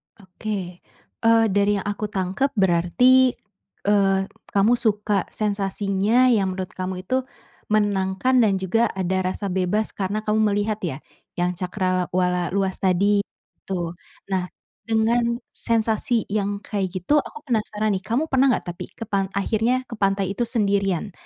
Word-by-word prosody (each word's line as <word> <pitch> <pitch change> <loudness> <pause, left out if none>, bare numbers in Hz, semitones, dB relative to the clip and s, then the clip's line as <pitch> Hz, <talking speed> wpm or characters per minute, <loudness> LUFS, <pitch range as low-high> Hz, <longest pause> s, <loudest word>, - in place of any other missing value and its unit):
Oke. 185 -2 -6 0.5
Eee, 225 0 +5
dari 205 +1 +3
yang 195 - -5
aku 205 +1 -2
tangkep, 195 +8 -1
berarti, 205 +8 +4 0.5
eee, 195 -2 +3 0.3
kamu 205 +4 +4
suka 210 -3 0
sensasinya 205 +3 +1
yang 195 -4 +2
menurut 185 -1 -5
kamu 185 0 -5
itu 255 +6 -1 0.4
menenangkan 205 +3 +2
dan 210 -5 +4
juga 190 +5 +1
ada 190 0 0
rasa 195 +1 -3
bebas 190 +4 0
karena 205 +2 -3
kamu 215 0 +1
melihat, 205 +1 -1
ya? 160 -7 -3 0.4
Yang 180 +1 -1
cakrawala 180 -2 0
luas 190 -1 0
tadi, 200 +2 +3 0.5
tu. 175 -3 -2 0.4
Nah, 185 -1 0 0.4
dengan 235 +1 +2 0.2
sensasi 225 0 0
yang 205 -1 -1
kayak 200 -3 -2
gitu, 195 - +2
aku 450 - -8
penasaran, 215 -4 -1
nih. 190 -1 -2
Kamu 275 +8 0
pernah 265 0 +4
gak 175 - -5
tapi 175 - -8
ke - - -6
pan 195 -3 -1
akhirnya 225 +5 +1
ke 230 -3 -10
pantai 195 -1 +1
itu 230 +4 -2
sendirian, 200 -4 0
200 Hz, 140 wpm, -23 LUFS, 190-220 Hz, 0.5 s, Eee